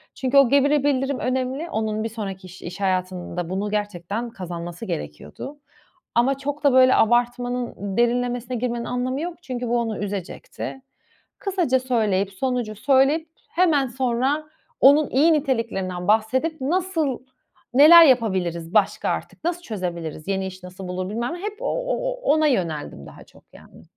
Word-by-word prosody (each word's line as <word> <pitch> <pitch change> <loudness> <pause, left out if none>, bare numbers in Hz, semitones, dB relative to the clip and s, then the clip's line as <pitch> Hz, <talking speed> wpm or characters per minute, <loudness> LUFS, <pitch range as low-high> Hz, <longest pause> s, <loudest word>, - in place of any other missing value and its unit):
Çünkü 265 +1 +1
o 275 -3 +7
geri 280 +1 +3
bildirim 275 -1 0
önemli. 260 +5 -2
Onun 215 -3 -2
bir 225 - -2
sonraki 195 -4 -6
iş 185 +1 -13
iş 180 +3 -8
hayatında 185 -2 -2
bunu 195 +3 -2
gerçekten 205 +2 -3
kazanması 175 -2 -7
gerekiyordu. 220 - -7 0.6
Ama 260 +3 +3
çok 290 +2 -5
da, 285 -2 +4
böyle, 260 0 +6
abartmanın, 240 -3 0
derinlemesine 245 +1 0
girmenin 235 0 -2
anlamı 255 +3 -2
yok. 345 +1 -6
Çünkü 250 -5 -4
bu 240 +1 +1
onu 225 -2 -2
üzecekti. 205 +6 -6 0.6
Kısaca 355 -10 +1
söyleyip, 210 -6 0
sonucu 245 0 -2
söyleyip, 280 +7 +2 0.2
hemen 315 -7 +2
sonra 260 +4 0 0.4
onun 285 +2 +6
iyi 305 +6 +4
niteliklerinden 230 - -1
bahsedip, 260 +9 +1
nasıl, 325 -3 0 0.5
neler 320 +6 +9
yapabiliriz 185 - +1
başka 210 -3 +2
artık, - - -5
nasıl 345 +1 -1
çözebiliriz, 175 - -5
yeni 195 -1 -1
iş 185 -1 -10
nasıl 180 +1 -9
bulur, 185 +1 -4
bilmem 235 +8 -2
ne. 350 - -7
Hep 420 +1 -5
o - - -4
o - - -1 0.2
ona 310 0 +3
yöneldim 165 - -2
daha - - -13
çok, - - -21
yani. - - -16
245 Hz, 150 wpm, -23 LUFS, 195-275 Hz, 0.6 s, neler